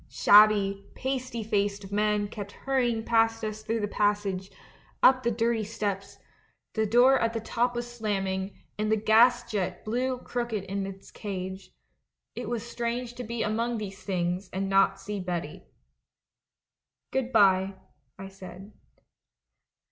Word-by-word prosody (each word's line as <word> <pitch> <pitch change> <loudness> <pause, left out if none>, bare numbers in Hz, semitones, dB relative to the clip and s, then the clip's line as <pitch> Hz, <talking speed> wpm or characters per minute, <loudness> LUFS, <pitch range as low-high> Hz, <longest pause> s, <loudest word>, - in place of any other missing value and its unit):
Shabby, 200 -1 +5
pasty 255 -3 -3
faced 200 -2 -1
men 210 0 +1
kept 205 -1 -8
hurrying 245 -4 0
past 225 -1 +2
us 215 0 -5
through 225 +1 -2
the 205 - 0
passage, 205 -2 0 0.5
up 255 0 +7
the 235 - +1
dir 230 +1 +1
ty - - -1
steps; 200 -2 -4 0.6
the 220 -1 0
door 250 +5 +5
at 230 0 0
the 225 - -1
top 240 +2 -1
was 240 0 -3
slamming, 195 -3 -2 0.2
and 215 0 0
the - - +5
gas 230 +3 +5
jet 185 -4 -3
blew 250 +4 -1
crooked 240 -4 -3
in 195 0 -3
its 195 0 -10
cage. 190 -2 -6 0.6
It - - -5
was 235 -2 -2
strange 240 0 -3
to 245 - -6
be 235 0 -3
among 230 +2 -1
these 200 -2 -6
things 180 0 -2
and 195 +1 -2
not 195 0 +3
see 205 +1 -5
Betty. 175 -4 -4 0.7
" - - -63
'Good 260 -1 -1
bye,' 195 -3 +4 0.4
I 195 0 -8
said. 195 +1 -11
210 Hz, 150 wpm, -28 LUFS, 195-235 Hz, 0.7 s, up